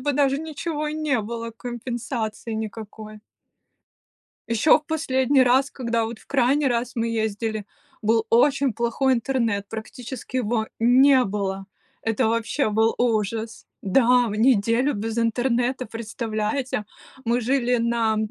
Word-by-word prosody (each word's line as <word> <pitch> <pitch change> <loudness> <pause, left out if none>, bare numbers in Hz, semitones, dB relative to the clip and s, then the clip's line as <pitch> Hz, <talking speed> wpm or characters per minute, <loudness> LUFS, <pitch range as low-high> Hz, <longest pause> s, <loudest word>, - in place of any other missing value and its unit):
бы 290 +2 0
даже 275 0 +2
ничего 310 0 -4
и 300 - -4
не 300 -6 0
было, 230 +2 -5
компенсации 235 -1 -5
никакой. 215 0 -7 1.3
Ещё 230 +6 +5
в 300 - -21
последний 270 -4 +2
раз, 260 +3 +3
когда 235 -3 -1
вот 225 0 -6
в - - -21
крайний 275 +2 +2
раз 240 0 -2
мы 230 0 0
ездили, 220 0 -3 0.4
был 225 +1 +2
очень 270 +2 +3
плохой 240 +4 +1
интернет, 230 -5 -1
практически 245 +3 -7
его 225 -2 0
не 255 +3 +5
было. 195 -1 -3 0.4
Это 225 -1 +1
вообще 230 +4 0
был 220 +2 +2
ужас 225 -1 -1 0.2
Да! 245 +4 +4
В 205 - -4
неделю 230 +3 +3
без 220 +2 -3
интернета, 245 +2 0
представляете? 225 +2 -3 0.4
Мы 235 +2 +2
жили 250 0 +1
на, 230 -1 +1
235 Hz, 130 wpm, -23 LUFS, 220-260 Hz, 1.3 s, Ещё